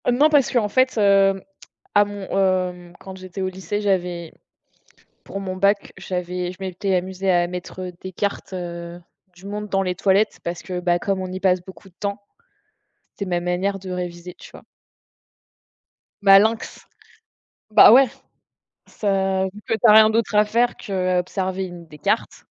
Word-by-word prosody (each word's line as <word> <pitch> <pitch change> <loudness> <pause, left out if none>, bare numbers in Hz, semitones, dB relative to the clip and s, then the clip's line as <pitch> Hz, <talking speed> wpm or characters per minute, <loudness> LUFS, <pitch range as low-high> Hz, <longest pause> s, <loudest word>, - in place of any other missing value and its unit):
Heu, - - +4
non 285 +6 +4
parce 290 -4 +3
qu'en 235 -4 +2
fait, 255 +2 +2
heu, 195 -2 +3 0.5
à 205 0 +6
mon 205 -1 -7
hem, 185 -2 0
quand 190 -1 -10
j'étais 185 +1 -8
au 190 - 0
lycée, 190 +3 -4
j'avais 180 -4 -1 0.9
pour 195 - -6
mon 185 -1 -5
bac, 200 +2 +1
j'avais 180 -1 -4
je - - -15
m'étais 190 +1 -2
amusée 190 +1 -2
à 175 -1 +3
mettre, 180 +1 -7
heu, 180 -1 -6
des 185 - -7
cartes, 200 +1 -3
heu, 170 -1 -6 0.3
du 175 +2 -14
monde 210 +1 -5
dans 195 -1 +1
les 180 -1 -1
toilettes, 195 +3 +1
parce 170 0 -4
que, 180 -1 -5
bah, 175 -1 +1
comme 195 +1 -2
on 185 -1 -5
y 185 - -5
passe 185 -1 +2
beaucoup 190 +1 -13
de 180 - -25
temps, 200 0 -3 0.9
c'était 200 -2 -5
ma 175 -1 0
manière 180 +3 -1
de 190 -1 -8
réviser, 180 0 -6
tu - - -13
vois? - - -13 1.6
Malinx, 205 +3 +4 0.9
bah, 215 - +8
ouais, 265 +2 +7 0.8
ça 195 -2 0
vu 190 +2 -6
que - - 0
tu 220 - -3
as 220 - +8
rien 215 0 +8
d'autre 225 -1 0
à 210 - +6
faire 235 +3 +1
qu'observer 185 -1 -2
une 175 -2 -9
des 150 -1 -14
cartes. - - -2
190 Hz, 175 wpm, -22 LUFS, 180-200 Hz, 1.6 s, bah